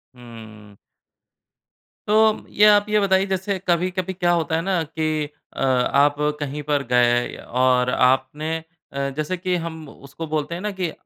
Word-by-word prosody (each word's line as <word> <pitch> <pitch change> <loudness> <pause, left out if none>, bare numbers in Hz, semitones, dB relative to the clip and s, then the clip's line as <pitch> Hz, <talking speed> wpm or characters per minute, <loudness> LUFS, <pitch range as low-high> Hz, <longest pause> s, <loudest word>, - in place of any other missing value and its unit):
हुँ। 110 -4 -13 1.3
तो 215 +1 +3
ये 210 - +4
आप 205 -1 +6
ये 210 0 +3
बताइए, 195 -1 +2
जैसे 190 +1 -2
कभी-कभी 180 +2 0
क्या 175 -1 +1
होता 160 -2 0
है 165 - 0
ना 185 -2 0
कि 155 -1 -2 0.3
अ, - - -7
आप 135 +2 +3 0.2
कहीं 145 0 -4
पर 145 -1 0
गए 120 0 +2
और 125 0 +1
आपने 130 +6 +1 0.4
अ, 140 0 -2
जैसे 155 +4 -2
कि 180 0 -1
हम 160 -2 -7
उसको 140 +5 -9
बोलते 155 +2 -2
हैं 175 - -6
ना 210 - -2
कि 175 -3 -1
155 Hz, 155 wpm, -22 LUFS, 130-185 Hz, 1.3 s, आप